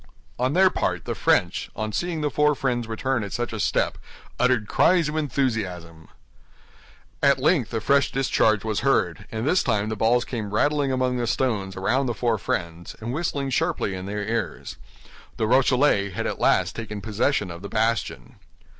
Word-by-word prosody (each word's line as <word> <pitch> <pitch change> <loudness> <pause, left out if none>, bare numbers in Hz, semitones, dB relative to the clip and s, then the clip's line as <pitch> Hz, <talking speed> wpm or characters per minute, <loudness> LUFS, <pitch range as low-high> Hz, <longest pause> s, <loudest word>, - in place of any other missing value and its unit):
On 130 +2 +1
their 185 +1 +5
part, - - -2
the - - -2
French, - - +1
on 110 0 -3
seeing 170 - -2
the 150 -1 -1
four 150 0 +3
friends 125 -4 -1
return 115 +1 -1
at 100 - -6
such 120 -1 -3
a 110 - -4
step, - - 0 0.4
uttered 125 -4 +2
cries 175 - +3
of 150 - -4
enthusiasm. 105 - -2 1.1
At 140 -1 +4
length 140 -3 +1
a 115 - -1
fresh 140 +4 +2
discharge 110 -5 +2
was 110 -2 -1
heard, 105 -7 0
and 110 +4 -3
this 180 +4 +3
time 110 -3 0
the 110 - -2
balls 115 +3 +2
came 105 -4 -4
rattling 145 +2 +2
among 130 -1 0
the 120 -1 -1
stones 110 -5 -1
around 130 +8 0
the 120 - -2
four 115 -3 0
friends, 85 -1 -4
and 115 +3 -4
whistling 140 -3 -2
sharply 160 - 0
in 95 0 -6
their 105 +1 -3
ears. 115 +2 -3 0.6
The 110 - 0
Rochellais 125 -3 +3
had 90 - -4
at - - -3
last - - +2
taken 105 -3 -6
possession 105 -2 0
of 85 0 -9
the 100 - -7
bastion. 110 - -1
120 Hz, 180 wpm, -24 LUFS, 105-135 Hz, 1.1 s, their